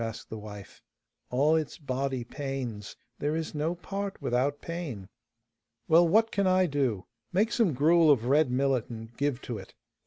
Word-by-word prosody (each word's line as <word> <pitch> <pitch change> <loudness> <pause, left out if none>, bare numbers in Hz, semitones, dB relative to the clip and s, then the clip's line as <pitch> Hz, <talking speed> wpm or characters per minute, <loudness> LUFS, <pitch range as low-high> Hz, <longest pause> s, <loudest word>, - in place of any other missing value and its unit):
asked 115 0 -6
the 110 - -4
wife. 105 -2 -10 0.5
'All 145 +5 +3
its 155 -2 -2
body 135 -4 -2
pains; 125 -6 -5 0.2
there 150 +2 0
is 160 -1 -3
no 155 +3 -1
part 195 +2 -5
without 135 +4 0
pain.' 155 - -6 0.8
'Well, 170 +2 +6
what 220 +6 +4
can 200 -1 +1
I 185 0 +4
do? 135 - -1 0.3
Make 215 +5 +2
some 220 -11 +2
gruel 160 +4 +5
of 125 -6 +4
red 145 +2 +4
millet, 130 -1 +1
and 115 0 -9
give 140 -1 -1
to 115 -4 -4
it. - - -13
140 Hz, 165 wpm, -29 LUFS, 120-165 Hz, 0.8 s, Well